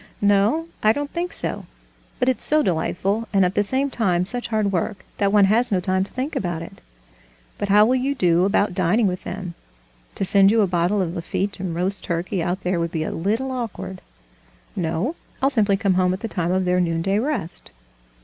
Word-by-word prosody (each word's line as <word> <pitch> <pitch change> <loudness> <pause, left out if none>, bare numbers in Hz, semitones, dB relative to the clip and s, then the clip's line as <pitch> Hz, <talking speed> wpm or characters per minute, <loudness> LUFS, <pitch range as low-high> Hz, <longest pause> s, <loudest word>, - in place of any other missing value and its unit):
"No, 205 +11 +3
I 215 +1 +4
don't 285 +2 -4
think 350 +1 -2
so; - - -2 0.5
but 250 - 0
it's 260 - +1
so 305 0 +4
delightful, 195 +5 -1
and 195 -2 +4
at 180 - 0
the 205 - +2
same 265 +7 0
time 180 -7 +1
such 245 +5 -4
hard 215 -3 0
work, 195 +3 -2
that 200 -1 +2
one 205 -1 +5
has 230 +4 +2
no 190 - +2
time 185 +1 0
to - - -15
think 260 +4 -4
about 175 -3 -2
it." - - -12 0.8
"But 205 - -2
how 210 +2 +6
will 245 - +2
you 275 +2 -1
do 175 -6 +3
about 200 -1 +1
dining 185 +5 +2
with 185 -2 -2
them? 185 -3 -5 0.6
To 195 - -1
send 195 +1 +5
you 225 +1 +4
a - - +4
bottle 180 +2 +1
of 170 -2 -4
Lafitte 195 +3 -3
and 180 -3 -3
roast 190 +3 -2
turkey 175 +2 -2
out 180 +3 -2
there 180 -1 -1
would 170 0 -2
be 160 -3 -2
a - - -3
little 225 +10 -1
awkward." 225 -6 -5 0.7
"No, 175 - -1 0.2
I'll 270 +1 +2
simply 205 -6 +2
come 195 -1 +1
home 180 0 +2
at 185 - -5
the 225 - -3
time 175 -5 -1
of 185 0 +1
their 180 0 +2
noonday 175 +3 0
rest." 230 - -3
195 Hz, 210 wpm, -22 LUFS, 180-225 Hz, 0.8 s, how